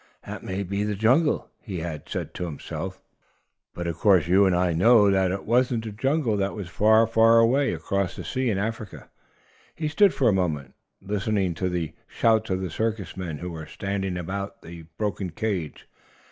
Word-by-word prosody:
"That -, -, -7 dB
may 95 Hz, +1 st, -3 dB
be 100 Hz, +2 st, -2 dB
the 105 Hz, 0 st, -1 dB
jungle," 130 Hz, +10 st, +2 dB
he 95 Hz, -5 st, -6 dB
had 80 Hz, -3 st, -6 dB
said -, -, -4 dB
to 90 Hz, -, -4 dB
himself. 80 Hz, -5 st, -6 dB, 0.8 s
But 85 Hz, -, -4 dB
of 85 Hz, -1 st, -3 dB
course 95 Hz, -7 st, +4 dB
you 95 Hz, +3 st, +5 dB
and 95 Hz, -, +2 dB
I 90 Hz, -1 st, +2 dB
know 105 Hz, +3 st, +5 dB
that 95 Hz, -1 st, +2 dB
it 95 Hz, +1 st, -4 dB
wasn't 120 Hz, 0 st, +2 dB
the 110 Hz, -, -5 dB
jungle. 130 Hz, +2 st, 0 dB
That 100 Hz, +1 st, -1 dB
was 100 Hz, -5 st, -6 dB
far, 110 Hz, +5 st, +4 dB
far 115 Hz, 0 st, +5 dB
away 130 Hz, +5 st, +4 dB
across 100 Hz, -2 st, -2 dB
the -, -, -7 dB
sea 130 Hz, -2 st, -1 dB
in 100 Hz, -, 0 dB
Africa. 110 Hz, +1 st, -5 dB, 0.6 s
He 155 Hz, -, -2 dB
stood 195 Hz, +6 st, +4 dB
for 135 Hz, -, +1 dB
a 105 Hz, -, +4 dB
moment, 75 Hz, -8 st, -1 dB, 0.3 s
listening 100 Hz, -2 st, 0 dB
to 90 Hz, +3 st, -2 dB
the 85 Hz, -3 st, -3 dB
shouts 110 Hz, -1 st, +2 dB
of 95 Hz, 0 st, -1 dB
the 95 Hz, -3 st, -4 dB
circus 110 Hz, -1 st, -2 dB
men, 90 Hz, -5 st, -5 dB
who 90 Hz, +3 st, -6 dB
were 80 Hz, -2 st, -7 dB
standing 95 Hz, -2 st, -3 dB
about 100 Hz, +5 st, -5 dB
the 85 Hz, -1 st, -10 dB
broken 100 Hz, -3 st, -2 dB
cage. 90 Hz, -2 st, -4 dB
100 Hz, 190 wpm, -25 LUFS, 90-110 Hz, 0.8 s, you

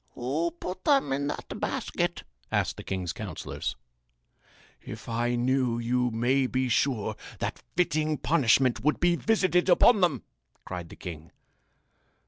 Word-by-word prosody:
"Who 145 Hz, +8 st, -1 dB
put 185 Hz, +1 st, -5 dB
them 275 Hz, -, +3 dB
in 140 Hz, +1 st, -1 dB
that 145 Hz, -, -5 dB
basket?" -, -, -2 dB, 0.3 s
asked -, -, 0 dB
the -, -, -7 dB
king's 90 Hz, -3 st, -3 dB
counsellors. 100 Hz, -8 st, -5 dB, 1.1 s
"If -, -, -9 dB
I 120 Hz, +1 st, 0 dB
knew 125 Hz, -1 st, +1 dB
you 125 Hz, +1 st, +1 dB
may 125 Hz, +4 st, +2 dB
be 130 Hz, 0 st, 0 dB
sure 110 Hz, -4 st, +1 dB, 0.2 s
that -, -, -4 dB, 0.2 s
fitting 155 Hz, -3 st, +1 dB
punishment 130 Hz, -6 st, +3 dB
would 150 Hz, +2 st, +2 dB
be 175 Hz, 0 st, +3 dB
visited 185 Hz, -3 st, +2 dB
upon 200 Hz, +4 st, +6 dB
them!" 155 Hz, -9 st, +2 dB, 0.4 s
cried 90 Hz, -2 st, -6 dB
the -, -, -11 dB
king. 80 Hz, -3 st, -8 dB
130 Hz, 135 wpm, -28 LUFS, 115-160 Hz, 1.1 s, upon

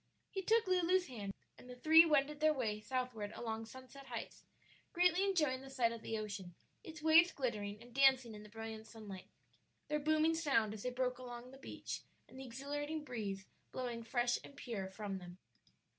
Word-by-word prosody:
He 385 Hz, -, -2 dB
took 450 Hz, +4 st, +3 dB
Lulu's 365 Hz, 0 st, +3 dB
hand, 205 Hz, -6 st, -5 dB, 0.3 s
and 250 Hz, -, -13 dB
the 250 Hz, -, -7 dB
three 320 Hz, +6 st, +8 dB
wended 295 Hz, -1 st, +2 dB
their 310 Hz, 0 st, +4 dB
way 215 Hz, -5 st, -1 dB
southward 245 Hz, -3 st, -3 dB
along 225 Hz, -1 st, -4 dB
Sunset 260 Hz, +3 st, -11 dB
Heights, -, -, -6 dB, 0.5 s
greatly 360 Hz, +1 st, +4 dB
enjoying 305 Hz, -10 st, +2 dB
the 270 Hz, -, -10 dB
sight 250 Hz, -4 st, +2 dB
of 230 Hz, -1 st, -6 dB
the 225 Hz, -, -2 dB
ocean, 200 Hz, -5 st, -5 dB, 0.3 s
its 315 Hz, -6 st, -9 dB
waves 330 Hz, +2 st, +7 dB
glittering 210 Hz, -6 st, -2 dB
and 240 Hz, +1 st, -14 dB
dancing 265 Hz, -3 st, +5 dB
in 210 Hz, -, -9 dB
the 210 Hz, -, -12 dB
brilliant 220 Hz, 0 st, -7 dB
sunlight, 205 Hz, -5 st, -9 dB, 0.6 s
their 300 Hz, 0 st, +1 dB
booming 310 Hz, +2 st, +3 dB
sound 275 Hz, -10 st, +2 dB
as 215 Hz, -, -7 dB
they 250 Hz, -, -1 dB
broke 250 Hz, 0 st, -1 dB
along 245 Hz, 0 st, -8 dB
the 265 Hz, -, -12 dB
beach -, -, -6 dB, 0.3 s
and 260 Hz, -, -12 dB
the 265 Hz, -, -6 dB
exhilarating 290 Hz, +5 st, -4 dB
breeze 205 Hz, -8 st, -4 dB, 0.3 s
blowing 240 Hz, -2 st, -3 dB
fresh 240 Hz, +1 st, +1 dB
and 280 Hz, -, -12 dB
pure 205 Hz, -8 st, -4 dB
from 195 Hz, 0 st, -4 dB
them. 175 Hz, 0 st, -10 dB
250 Hz, 185 wpm, -37 LUFS, 220-300 Hz, 0.6 s, three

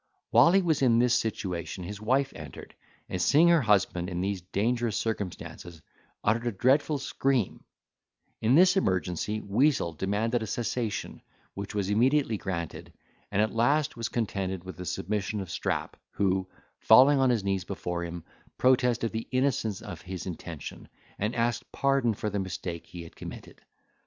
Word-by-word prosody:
While 120 Hz, +8 st, +7 dB
he 195 Hz, 0 st, +4 dB
was 160 Hz, -5 st, +1 dB
in 120 Hz, -3 st, +4 dB
this 120 Hz, 0 st, +3 dB
situation 95 Hz, -6 st, -2 dB
his 105 Hz, +3 st, -7 dB
wife 135 Hz, +5 st, +1 dB
entered, 75 Hz, -4 st, -10 dB, 0.3 s
and, 90 Hz, -, -3 dB
seeing 155 Hz, -, +5 dB
her 170 Hz, -2 st, +5 dB
husband 95 Hz, -5 st, +2 dB
in 90 Hz, -1 st, -3 dB
these 95 Hz, 0 st, -2 dB
dangerous 110 Hz, +5 st, -1 dB
circumstances, 90 Hz, -5 st, -5 dB, 0.4 s
uttered 115 Hz, +3 st, +1 dB
a -, -, +1 dB
dreadful 135 Hz, +8 st, +2 dB
scream: 135 Hz, -5 st, -1 dB, 0.8 s
in 115 Hz, +4 st, +4 dB
this 185 Hz, +4 st, +6 dB
emergency, 95 Hz, -, 0 dB
Weazel 110 Hz, -, +1 dB
demanded 110 Hz, +7 st, 0 dB
a 110 Hz, -, -4 dB
cessation, 115 Hz, -2 st, -3 dB, 0.3 s
which 100 Hz, +2 st, -6 dB
was 100 Hz, -1 st, -1 dB
immediately 125 Hz, +2 st, +3 dB
granted; 85 Hz, -5 st, -5 dB, 0.4 s
and 105 Hz, -, +3 dB
at 110 Hz, -, -2 dB
last 145 Hz, +6 st, +2 dB
was 115 Hz, -2 st, -3 dB
contented 95 Hz, -5 st, -2 dB
with 95 Hz, -3 st, -9 dB
the 90 Hz, -, -6 dB
submission 105 Hz, +2 st, -2 dB
of 95 Hz, -4 st, -6 dB
Strap, -, -, -2 dB, 0.2 s
who, 95 Hz, -1 st, 0 dB, 0.3 s
falling 135 Hz, +5 st, +7 dB
on 130 Hz, -1 st, +4 dB
his 115 Hz, -5 st, +1 dB
knees 95 Hz, -1 st, 0 dB
before 90 Hz, -3 st, -4 dB
him, 85 Hz, -1 st, -6 dB, 0.3 s
protested 125 Hz, -3 st, +3 dB
the 110 Hz, 0 st, -4 dB
innocence 130 Hz, -6 st, 0 dB
of -, -, -8 dB
his 90 Hz, -1 st, -6 dB
intention, 85 Hz, -3 st, -7 dB, 0.3 s
and 105 Hz, +4 st, -1 dB
asked 120 Hz, +1 st, -1 dB
pardon 135 Hz, -5 st, +1 dB
for 105 Hz, +1 st, -3 dB
the 100 Hz, -, -1 dB
mistake 90 Hz, -2 st, -5 dB
he 85 Hz, -1 st, -8 dB
had 85 Hz, -, -13 dB
committed. -, -, -10 dB
110 Hz, 160 wpm, -28 LUFS, 95-125 Hz, 0.8 s, While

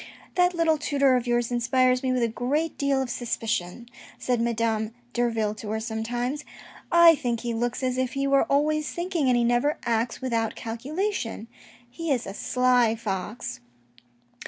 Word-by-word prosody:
" -, -, -24 dB
That 360 Hz, 0 st, +3 dB
little 325 Hz, -2 st, +2 dB
tutor 280 Hz, -3 st, +3 dB
of 250 Hz, -1 st, -1 dB
yours 240 Hz, 0 st, +1 dB
inspires 255 Hz, +1 st, +2 dB
me 260 Hz, -, 0 dB
with 250 Hz, -1 st, +1 dB
a -, -, +3 dB
great 275 Hz, +8 st, -1 dB
deal 275 Hz, -1 st, +1 dB
of 255 Hz, -, -6 dB
suspicion," 230 Hz, -3 st, -3 dB, 0.3 s
said 245 Hz, -2 st, 0 dB
Madame 230 Hz, -1 st, -1 dB, 0.2 s
Derville 225 Hz, -3 st, 0 dB
to 215 Hz, 0 st, -8 dB
her 220 Hz, +1 st, -1 dB
sometimes. 240 Hz, +5 st, -3 dB, 0.2 s
" -, -, -20 dB
I 340 Hz, -1 st, +8 dB
think 240 Hz, -6 st, -2 dB
he 240 Hz, -1 st, -2 dB
looks 240 Hz, +3 st, -2 dB
as 255 Hz, 0 st, 0 dB
if 260 Hz, -1 st, -1 dB
he 275 Hz, 0 st, -1 dB
were 275 Hz, 0 st, +3 dB
always 300 Hz, +2 st, +1 dB
thinking, 345 Hz, -5 st, -1 dB
and 250 Hz, -1 st, +4 dB
he 240 Hz, -, +2 dB
never 240 Hz, +5 st, +2 dB
acts 230 Hz, 0 st, 0 dB
without 230 Hz, -4 st, -1 dB
calculation. 250 Hz, -, -3 dB, 0.4 s
He 330 Hz, +7 st, -6 dB
is 250 Hz, -3 st, 0 dB
a 195 Hz, -, -6 dB
sly 250 Hz, 0 st, +2 dB
fox." 190 Hz, -, -4 dB
245 Hz, 175 wpm, -26 LUFS, 230-275 Hz, 0.4 s, I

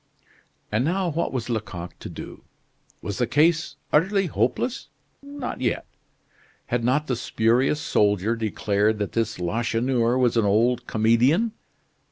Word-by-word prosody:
And 110 Hz, +3 st, +1 dB
now 180 Hz, +4 st, 0 dB
what 165 Hz, +1 st, -1 dB
was 125 Hz, -3 st, -3 dB
Lecoq 100 Hz, -7 st, -4 dB
to -, -, -7 dB
do? -, -, -9 dB, 0.6 s
Was 100 Hz, +4 st, -4 dB
the 125 Hz, -, +1 dB
case 165 Hz, +4 st, +2 dB, 0.2 s
utterly 195 Hz, +6 st, +3 dB
hopeless? 250 Hz, -, -1 dB, 0.3 s
Not 280 Hz, -, -6 dB
yet. 120 Hz, -, -1 dB, 0.8 s
Had 120 Hz, -1 st, -1 dB
not 135 Hz, +5 st, +2 dB
the 130 Hz, -, -1 dB
spurious 120 Hz, +5 st, +1 dB
soldier 105 Hz, -, +1 dB
declared 105 Hz, -1 st, 0 dB
that 105 Hz, -1 st, -3 dB
this 110 Hz, -1 st, -1 dB
Lacheneur 115 Hz, +6 st, 0 dB
was 125 Hz, -2 st, +2 dB
an 115 Hz, -, +3 dB
old 120 Hz, +4 st, +2 dB
comedian? 120 Hz, -, +3 dB
120 Hz, 135 wpm, -24 LUFS, 110-150 Hz, 0.8 s, utterly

